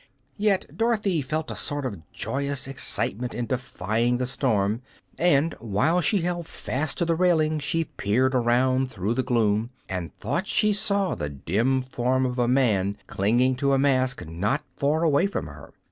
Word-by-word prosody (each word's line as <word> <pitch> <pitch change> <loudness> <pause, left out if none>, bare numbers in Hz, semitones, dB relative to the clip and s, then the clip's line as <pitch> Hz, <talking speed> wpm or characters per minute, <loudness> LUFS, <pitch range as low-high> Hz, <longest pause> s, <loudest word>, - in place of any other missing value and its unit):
Yet 205 -2 +2
Dorothy 210 -7 +1
felt 155 +3 -3
a - - -5
sort 145 -1 -2
of 100 -9 -4
joyous 140 -1 -2
excitement 125 -3 -2
in 120 - -2
defying 120 -1 -1
the 125 - -1
storm, 115 -4 0 0.3
and 165 -2 +3
while 115 - +1
she 190 +4 +2
held 175 -1 -2
fast 140 +3 -3
to 170 - +1
the 165 - +2
railing 160 -3 +2
she 150 +3 0
peered 130 0 0
around 130 +2 +2
through 105 -1 -2
the 130 - +1
gloom 115 -3 +1 0.2
and 90 -3 -4
thought 145 - -2
she 210 -1 +3
saw 200 -2 +1
the 75 - -4
dim 110 - 0
form 130 0 0
of 125 0 -2
a 120 - +2
man 105 -6 +2
clinging 120 +6 +2
to 140 0 +2
a - - +4
mast 130 -7 +1
not 100 - -1
far 150 +3 +1
away 155 +3 +3
from 200 - -3
her. - - -11
130 Hz, 170 wpm, -25 LUFS, 115-155 Hz, 0.3 s, a